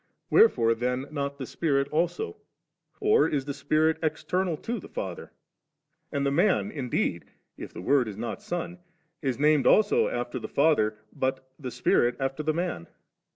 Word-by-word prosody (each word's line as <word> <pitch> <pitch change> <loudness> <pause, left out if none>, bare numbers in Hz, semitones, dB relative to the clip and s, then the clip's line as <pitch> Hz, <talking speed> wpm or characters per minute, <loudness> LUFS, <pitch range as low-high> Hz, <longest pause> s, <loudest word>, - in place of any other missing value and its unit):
Wherefore 115 - +5
then 125 +3 -2
not 140 -1 -3
the 135 - -5
Spirit 140 -1 0
also? 175 - -1 0.6
or 430 +2 +4
is 140 -3 -1
the 140 - -3
Spirit 155 +3 +1
external 170 +2 -1
to 235 +9 -4
the - - -11
Father? - - -6 0.8
and 140 -2 -1
the 140 - +2
Man 190 +6 +2
indeed 125 - -2 0.3
(if - - -8
the - - -8
Word 135 +1 +3
is 105 -2 -6
not 115 +2 -4
Son) 175 0 -4 0.4
is 130 -4 -1
named 150 -1 +3
after 460 - +2
the - - -6
Father, 140 -8 +2 0.2
but 130 0 -2
the 130 -3 -5
Spirit 120 +1 +2
after 135 +2 -2
the 155 +1 +1
Man 170 - -3
145 Hz, 155 wpm, -27 LUFS, 130-170 Hz, 0.8 s, Wherefore